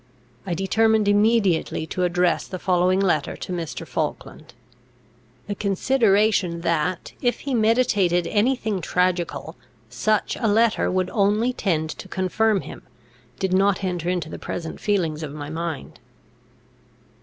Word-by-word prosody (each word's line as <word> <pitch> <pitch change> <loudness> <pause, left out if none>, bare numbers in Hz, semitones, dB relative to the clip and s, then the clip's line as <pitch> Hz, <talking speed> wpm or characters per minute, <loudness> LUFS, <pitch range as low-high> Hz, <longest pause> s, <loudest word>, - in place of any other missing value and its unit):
I 175 - -1
determined 215 +3 +2
immediately 205 -6 +2
to 180 - -4
address 180 -1 +1
the 185 - -5
following 185 0 +2
letter 175 -7 0
to 185 - -6
Mr. 170 -3 -5
Falkland. - - -5 0.9
The 205 - -3
consideration 200 -4 +2
that, 170 +1 -1
if 245 -2 0
he 275 - -3
meditated 215 -7 +2
any 225 +8 +2
thing 215 -6 -3
tragical, 175 -2 -1 0.3
such 215 - 0
a 225 - +2
letter 220 +1 +3
would 185 0 -1
only 210 +4 +2
tend 160 -8 -1
to - - -9
confirm 195 +2 +1
him, - - -10 0.6
did 190 -1 -1
not 195 +1 +2
enter 175 -2 -2
into 175 -4 -1
the - - -8
present 165 -2 -5
feelings 170 -7 0
of 150 -3 -6
my 145 0 -7
mind. 165 -2 -5
185 Hz, 135 wpm, -23 LUFS, 170-215 Hz, 0.9 s, letter